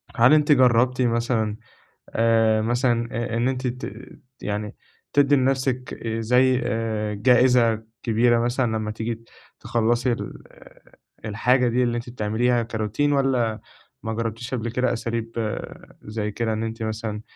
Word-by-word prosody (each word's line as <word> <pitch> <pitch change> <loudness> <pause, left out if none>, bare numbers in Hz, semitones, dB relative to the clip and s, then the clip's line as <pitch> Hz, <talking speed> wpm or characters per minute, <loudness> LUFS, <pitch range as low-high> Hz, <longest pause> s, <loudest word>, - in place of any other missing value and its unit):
هل 120 +5 +6
أنتِ 150 -1 +4
جرّبتِ 125 -1 +4
مثلًا 115 -2 0 0.5
آآ، 115 -1 +3
مثلًا 120 +1 +1
آآ، 115 -1 -2
إن 120 - +1
أنتِ 130 0 -1
ت 125 +2 -5 0.5
يعني 105 0 -4 0.4
تدّي 145 0 +4
لنفْسِك 130 -1 0
آآ 115 0 -2
زي 125 +2 +3
آآ 110 -2 -2
جائزة 120 0 +4 0.2
كبيرة 120 0 +3
مثلًا 120 -1 0
لمّا 110 -1 -3
تيجي 115 +1 -5 0.3
تخلّصي 120 +2 +1
ال 115 - -5 0.8
الحاجة 125 +4 +2
دي 125 +2 +2
اللي 120 -1 0
أنتِ 120 +1 -6
بتعمليها 115 +1 0
كRoutine؟ 110 +1 -3
والّا 125 -5 +1 0.4
ماجرّبتيش 115 +2 -4
قبل 120 -1 -2
كده 125 +1 0
أساليب 115 -1 -3 0.5
زي 105 0 -4
كده، 110 +1 -1
إن 110 +1 -2
أنتِ 115 0 -4
مثلًا 110 -1 -4
115 Hz, 135 wpm, -23 LUFS, 110-125 Hz, 0.8 s, هل